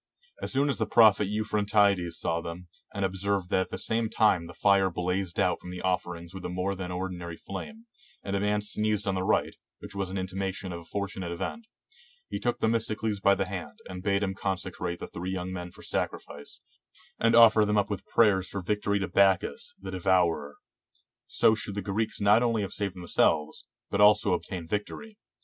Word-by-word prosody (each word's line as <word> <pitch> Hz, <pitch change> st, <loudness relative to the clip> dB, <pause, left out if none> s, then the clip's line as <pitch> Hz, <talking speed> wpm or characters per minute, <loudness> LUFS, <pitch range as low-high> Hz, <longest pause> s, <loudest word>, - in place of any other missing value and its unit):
As -, -, -3 dB
soon 140 Hz, +1 st, +2 dB
as 140 Hz, -, -1 dB
the -, -, 0 dB
prophet 105 Hz, -3 st, +5 dB
Euphrantides 105 Hz, -3 st, +1 dB
saw 85 Hz, 0 st, -1 dB
them, 85 Hz, +1 st, -8 dB, 0.2 s
and 100 Hz, -1 st, -1 dB
observed 95 Hz, -1 st, -1 dB
that 95 Hz, -, +3 dB
at -, -, -3 dB
the -, -, -5 dB
same 115 Hz, 0 st, 0 dB
time 95 Hz, -7 st, +2 dB
the 85 Hz, -, -10 dB
fire 100 Hz, -1 st, +4 dB
blazed 90 Hz, 0 st, -2 dB
out -, -, +1 dB
from 90 Hz, -, -9 dB
the 90 Hz, 0 st, -7 dB
offerings 90 Hz, -2 st, -2 dB
with 95 Hz, -1 st, -8 dB
a -, -, -3 dB
more 90 Hz, +2 st, -1 dB
than 95 Hz, -2 st, -5 dB
ordinary 90 Hz, -2 st, -5 dB
flame, 220 Hz, -, -8 dB, 0.4 s
and 100 Hz, -, -2 dB
a -, -, +1 dB
man 105 Hz, +1 st, 0 dB
sneezed 105 Hz, -1 st, 0 dB
on 95 Hz, -, +1 dB
the 95 Hz, -, -1 dB
right, 95 Hz, -, +1 dB, 0.2 s
which -, -, -10 dB
was 100 Hz, -1 st, -2 dB
an 95 Hz, -, -4 dB
intimation 95 Hz, 0 st, -3 dB
of 85 Hz, -, -5 dB
a 85 Hz, -, -14 dB
fortunate 95 Hz, -1 st, -4 dB
event, 220 Hz, -, -5 dB, 0.6 s
he -, -, -4 dB
took 120 Hz, 0 st, -1 dB
Themistocles 110 Hz, -2 st, 0 dB
by 100 Hz, 0 st, +4 dB
the 95 Hz, -, -1 dB
hand, 90 Hz, -2 st, -6 dB
and 90 Hz, -1 st, -7 dB
bade 100 Hz, +1 st, +1 dB
him 95 Hz, -1 st, -1 dB
consecrate 90 Hz, -2 st, -3 dB
the -, -, -6 dB
three 90 Hz, +2 st, -6 dB
young 95 Hz, 0 st, -4 dB
men 90 Hz, -1 st, -5 dB
for -, -, -15 dB
sacrifice, 70 Hz, 0 st, -4 dB, 0.6 s
and 115 Hz, 0 st, +3 dB
offer 115 Hz, -2 st, +8 dB
them 105 Hz, 0 st, +1 dB
up 105 Hz, 0 st, +1 dB
with 100 Hz, -, -3 dB
prayers 100 Hz, -5 st, +3 dB
for 100 Hz, -2 st, -5 dB
victory 100 Hz, +1 st, 0 dB
to 95 Hz, -2 st, -2 dB
Bacchus 95 Hz, -2 st, +2 dB
the 95 Hz, 0 st, -7 dB
De 95 Hz, -, -4 dB
vourer: 85 Hz, -6 st, +2 dB, 0.7 s
so 110 Hz, -, +4 dB
should 105 Hz, -2 st, -5 dB
the 105 Hz, -, -2 dB
Greeks 110 Hz, +3 st, -2 dB
not 105 Hz, +3 st, +5 dB
only 115 Hz, -4 st, +1 dB
save 100 Hz, -2 st, -3 dB
themselves, 80 Hz, -3 st, +1 dB, 0.3 s
but 100 Hz, -, +1 dB
also 105 Hz, -2 st, +6 dB
obtain 90 Hz, -1 st, -4 dB
victory. 205 Hz, -, -5 dB
95 Hz, 200 wpm, -28 LUFS, 90-105 Hz, 0.7 s, offer